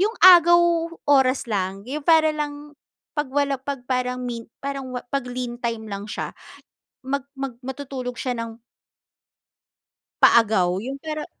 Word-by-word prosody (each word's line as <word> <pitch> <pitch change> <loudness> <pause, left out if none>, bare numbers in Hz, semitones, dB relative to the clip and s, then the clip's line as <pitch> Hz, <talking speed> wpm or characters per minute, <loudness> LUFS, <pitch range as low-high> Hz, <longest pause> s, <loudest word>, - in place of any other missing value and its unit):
'yung 430 +4 +1
agaw 345 -1 +8 0.5
oras 265 -2 +4
lang, 195 -1 -2
'yon 295 +3 -3
para 315 -2 +5
lang 295 -1 -5 0.4
'pag 295 -2 -1
wala 280 -1 0
'pag 270 -2 -5
parang 250 0 -1
me 235 -2 -5
parang 275 -1 -4 0.2
pag-lean 245 -2 -3
time 230 -2 -3
lang 200 +1 -6
siya, - - -4 0.7
mag 280 +1 -3
mag 270 -2 -4
matutulog 260 -2 -6
siya 255 - -2
ng 230 -1 -6 1.7
paagaw 190 -6 +5
yung 265 +4 -5
pero 305 0 -4
265 Hz, 130 wpm, -23 LUFS, 240-290 Hz, 1.7 s, agaw